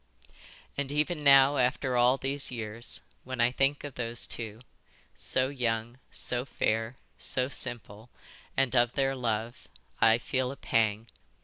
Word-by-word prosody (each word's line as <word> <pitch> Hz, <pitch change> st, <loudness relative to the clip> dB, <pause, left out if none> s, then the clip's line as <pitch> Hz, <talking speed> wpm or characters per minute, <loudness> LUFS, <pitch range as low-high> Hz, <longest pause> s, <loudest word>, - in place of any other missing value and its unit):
"And 140 Hz, -1 st, -2 dB
even 150 Hz, +2 st, 0 dB
now 140 Hz, 0 st, +6 dB
after 125 Hz, 0 st, +1 dB
all 125 Hz, +2 st, +4 dB
these 135 Hz, +1 st, 0 dB
years, 115 Hz, -1 st, -4 dB, 0.2 s
when 130 Hz, -1 st, -6 dB
I 120 Hz, +1 st, +4 dB
think 135 Hz, +2 st, +1 dB
of 145 Hz, -2 st, -7 dB
these 120 Hz, -1 st, 0 dB
two, 110 Hz, -1 st, -6 dB, 0.5 s
so 130 Hz, +1 st, +1 dB
young, 120 Hz, -2 st, -2 dB
so 125 Hz, 0 st, -1 dB
fair, 115 Hz, -2 st, -1 dB, 0.2 s
so 130 Hz, 0 st, +1 dB
simple, 120 Hz, -4 st, -1 dB, 0.5 s
and 135 Hz, -1 st, +2 dB
of 120 Hz, -1 st, +3 dB
their 135 Hz, -1 st, +1 dB
love, 115 Hz, -, -3 dB, 0.3 s
I 115 Hz, 0 st, +5 dB
feel 130 Hz, +1 st, -2 dB
a 140 Hz, -, -9 dB
pang. 110 Hz, -1 st, 0 dB
125 Hz, 140 wpm, -29 LUFS, 115-135 Hz, 0.5 s, now